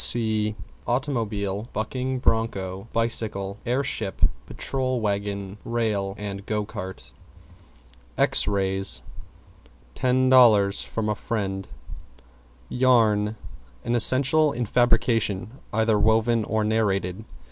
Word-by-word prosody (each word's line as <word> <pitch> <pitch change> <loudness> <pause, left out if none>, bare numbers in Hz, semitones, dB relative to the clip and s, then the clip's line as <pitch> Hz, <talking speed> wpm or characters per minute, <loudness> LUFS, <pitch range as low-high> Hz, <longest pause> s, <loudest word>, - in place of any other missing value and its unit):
See 110 -2 +4 0.3
Automobile, 115 -6 -2
Bucking 130 +4 -3
Broncho, 100 -5 -1
Bicycle, 105 -3 -2
Air 125 +3 +1
Ship, 100 -7 -3 0.3
Patrol 130 -2 -2
Wagon, 100 -1 -3
Rail, 105 -4 -2
and 100 -1 -6
Go 105 -1 -1
Cart. 95 -2 -8 1.0
=X - - +3
RAYS= 95 -9 +1 0.9
Ten 130 - +1
dollars 110 -6 +5
from 110 -1 -4
a 105 - +1
friend. 95 -3 -4 1.0
=YARN= 110 -4 +2 0.5
An 120 - -1
essential 135 +5 +5
in 120 -2 -3
fabrication 115 -1 +1
either 110 -1 +1
woven 110 +1 +2
or 110 -1 -1
narrated. 105 -3 -1
110 Hz, 100 wpm, -24 LUFS, 100-120 Hz, 1.0 s, dollars